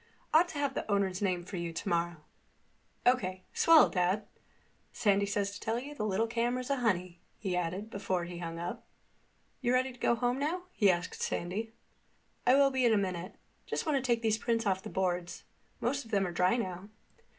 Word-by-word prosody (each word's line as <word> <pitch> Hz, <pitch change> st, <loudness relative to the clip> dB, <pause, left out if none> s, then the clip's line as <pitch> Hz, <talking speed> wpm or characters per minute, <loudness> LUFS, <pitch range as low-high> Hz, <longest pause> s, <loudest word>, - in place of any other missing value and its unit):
Ought 330 Hz, +3 st, +6 dB
to 320 Hz, -, -7 dB
have 285 Hz, -2 st, 0 dB
the 220 Hz, -, -3 dB
owner's 195 Hz, -2 st, +1 dB
name 180 Hz, -3 st, 0 dB
for 190 Hz, 0 st, -6 dB
you 170 Hz, -1 st, -3 dB
tomorrow." 170 Hz, -1 st, -2 dB, 0.8 s
"O.K. 185 Hz, -7 st, +2 dB
Swell, 330 Hz, -2 st, +7 dB
Dad. 185 Hz, +3 st, 0 dB, 0.7 s
Sandy 200 Hz, -1 st, +2 dB
says 200 Hz, -1 st, 0 dB
to 200 Hz, -, -8 dB
tell 225 Hz, +1 st, -1 dB
you 275 Hz, +4 st, -6 dB
the 235 Hz, -, -4 dB
little 205 Hz, +3 st, +1 dB
camera's 240 Hz, +3 st, -1 dB
a 280 Hz, -, +2 dB
honey," 185 Hz, -7 st, 0 dB, 0.2 s
he 190 Hz, -4 st, -2 dB
added 180 Hz, +5 st, -2 dB
before 190 Hz, -4 st, -1 dB
he 175 Hz, 0 st, -7 dB
hung 165 Hz, -1 st, -5 dB
up. 170 Hz, +1 st, -5 dB, 0.8 s
"You 245 Hz, -1 st, +2 dB
ready 255 Hz, +1 st, +2 dB
to 245 Hz, -, -18 dB
go 235 Hz, -, +3 dB
home 245 Hz, +2 st, 0 dB
now?" 330 Hz, +6 st, -1 dB
he 205 Hz, -, +3 dB
asked 175 Hz, -1 st, -1 dB
Sandy. 210 Hz, +6 st, -2 dB, 0.7 s
"I 255 Hz, -, +7 dB
will 275 Hz, 0 st, +5 dB
be 260 Hz, -1 st, +1 dB
in 235 Hz, -2 st, +5 dB
a -, -, +3 dB
minute. 185 Hz, -3 st, -3 dB, 0.3 s
Just -, -, -2 dB
want 305 Hz, -2 st, +1 dB
to 270 Hz, -, +2 dB
take 240 Hz, -2 st, +1 dB
these 220 Hz, -1 st, +2 dB
prints 230 Hz, -1 st, 0 dB
off 190 Hz, -2 st, +1 dB
the -, -, -7 dB
boards. 180 Hz, -2 st, -2 dB, 0.4 s
Most 275 Hz, +4 st, -1 dB
of 225 Hz, -, -15 dB
them 200 Hz, -3 st, +2 dB
are 180 Hz, -, -3 dB
dry 180 Hz, +6 st, +2 dB
now." 185 Hz, -3 st, -4 dB
205 Hz, 200 wpm, -31 LUFS, 180-245 Hz, 0.8 s, Swell